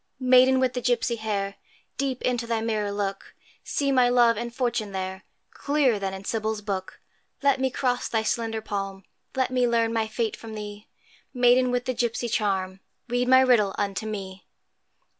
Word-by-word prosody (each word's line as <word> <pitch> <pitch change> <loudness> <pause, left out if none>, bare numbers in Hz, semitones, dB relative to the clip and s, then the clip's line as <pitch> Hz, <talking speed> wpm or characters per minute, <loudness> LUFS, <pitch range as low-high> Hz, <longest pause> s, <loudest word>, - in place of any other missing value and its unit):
Maiden 255 0 +5
with 260 -1 +1
the 250 - -3
gipsy 240 -1 +1
hair, 200 -2 -3 0.4
Deep 270 -2 -2
into 245 -2 0
thy 230 -1 0
mirror 215 -2 -1
look, 200 -1 -4 0.3
See 280 -1 0
my 250 -2 +4
love 240 -1 +5
and 235 +2 -4
fortune 235 -5 -2
there, 190 0 -4 0.3
Clearer 280 -7 +1
than 195 -1 -2
in 190 0 -8
Sybil's 220 -1 -2
book: 195 -2 -4 0.4
Let 280 -2 +3
me 265 - +2
cross 250 -1 -1
thy 225 -1 0
slender 225 0 -1
palm, 195 -2 -4 0.3
Let 260 -1 0
me 250 -1 +2
learn 230 -1 +1
my 225 -1 0
fate 220 0 -2
from 225 -1 -9
thee; 210 0 -8 0.5
Maiden 250 +1 +4
with 245 0 -1
the 255 - -1
gipsy 240 0 -1
charm, 190 -4 -1 0.3
Read 245 +1 0
my 260 0 +7
riddle 230 -7 +3
unto 205 +2 -2
me. 195 -3 -6
230 Hz, 175 wpm, -25 LUFS, 205-250 Hz, 0.5 s, my